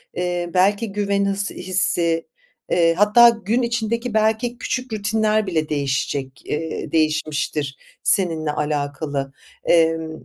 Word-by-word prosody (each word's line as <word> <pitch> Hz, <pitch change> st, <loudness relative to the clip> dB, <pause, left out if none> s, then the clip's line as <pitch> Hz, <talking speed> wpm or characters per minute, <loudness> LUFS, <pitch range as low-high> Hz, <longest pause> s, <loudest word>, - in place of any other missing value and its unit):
Eee, 175 Hz, -1 st, -2 dB
belki 200 Hz, +3 st, +2 dB
güven 200 Hz, -1 st, 0 dB
hıs 200 Hz, 0 st, -1 dB
hissi, 170 Hz, -3 st, -1 dB, 0.4 s
eee, 165 Hz, -1 st, +4 dB
hatta 210 Hz, +4 st, +7 dB
gün 230 Hz, +2 st, 0 dB
içindeki, 235 Hz, 0 st, -1 dB
belki, 220 Hz, +3 st, +1 dB
küçük 255 Hz, -2 st, -3 dB
rutinler 215 Hz, 0 st, +1 dB
bile 160 Hz, -4 st, -1 dB
değişecek, 135 Hz, -2 st, -2 dB
eee, 160 Hz, +1 st, -4 dB
değişmiştir 155 Hz, -3 st, 0 dB, 0.3 s
seninle 165 Hz, -6 st, +1 dB
alakalı. 145 Hz, -2 st, -2 dB, 0.3 s
Emm, 160 Hz, -1 st, +2 dB
180 Hz, 110 wpm, -21 LUFS, 155-215 Hz, 0.4 s, hatta